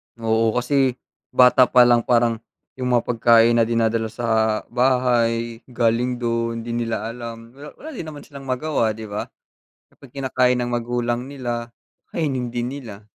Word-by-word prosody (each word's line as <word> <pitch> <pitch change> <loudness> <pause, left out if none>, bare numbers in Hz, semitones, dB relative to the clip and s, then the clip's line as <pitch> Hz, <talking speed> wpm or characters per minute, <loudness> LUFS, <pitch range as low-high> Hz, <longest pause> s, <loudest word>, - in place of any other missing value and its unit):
Oo, 115 -1 +1
kasi 130 0 +1 0.4
bata 125 0 +6
pa 125 -1 +6
lang 120 -1 +5
parang 115 -2 +2 0.4
yung 125 -1 -1
mga 120 - +3
pagkain 115 0 +4
na 115 - +4
dinadala 115 -1 +1
sa 110 -1 0
bahay 120 -2 +1
galing 120 0 0
dun, 115 0 -1
di 120 - -6
nila 115 -1 -2
alam 115 -1 -8
wala 145 +1 -10
wala 315 - -10
din 240 - -7
naman 150 -2 -9
silang 140 -2 -12
magawa, 130 -4 0
di 110 - -8
ba? 100 - -4 0.6
Kapag 135 -3 -18
kinakain 130 -2 +1
ng 120 0 -2
magulang 120 +1 -2
nila, 120 -4 -4 0.5
kainin 135 -7 -1
din 120 0 -2
nila. 115 -7 -9
120 Hz, 155 wpm, -22 LUFS, 115-125 Hz, 0.6 s, bata